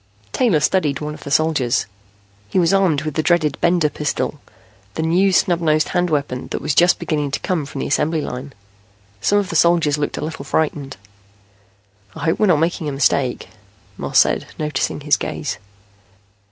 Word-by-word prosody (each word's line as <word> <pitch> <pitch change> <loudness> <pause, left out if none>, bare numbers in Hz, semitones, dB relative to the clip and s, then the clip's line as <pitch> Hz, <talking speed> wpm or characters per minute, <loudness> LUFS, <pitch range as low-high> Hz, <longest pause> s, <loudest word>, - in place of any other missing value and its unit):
Taylor 225 -12 +2
studied 150 -3 +1
one 150 0 -4
of - - -12
the - - -5
soldiers. 145 -5 +1 0.6
He - - -2
was 175 0 +3
armed 180 -7 +2
with 155 -1 -3
the 155 - 0
dreaded 155 -3 +1
Bender 170 -2 +3
pistol, 150 0 -3 0.6
the 160 - -2
new 180 +4 +3
snub 175 -1 +2
nosed 155 -2 +2
hand 180 -1 0
weapon 140 -4 -2
that - - -4
was 150 0 -1
just 175 +4 +4
beginning 150 -2 -2
to 135 - -2
come 170 -7 -2
from 140 - -6
the - - -2
assembly 155 +2 +1
line. 135 +1 -6 0.7
Some 205 - +2
of 200 -2 0
the - - -4
soldiers 165 -4 +3
looked 145 - -2
a - - -3
little 155 -3 -6
frightened. 140 -3 -2 1.2
"I - - -7
hope 160 - +1
we're 215 - +3
not 175 - +5
making 160 0 -1
a - - -3
mistake," 135 -2 0 0.5
Moss - - -2
said, - - +3
noticing 150 -1 -2
his 150 +1 +2
gaze. 75 +4 -4
155 Hz, 180 wpm, -20 LUFS, 145-170 Hz, 1.2 s, not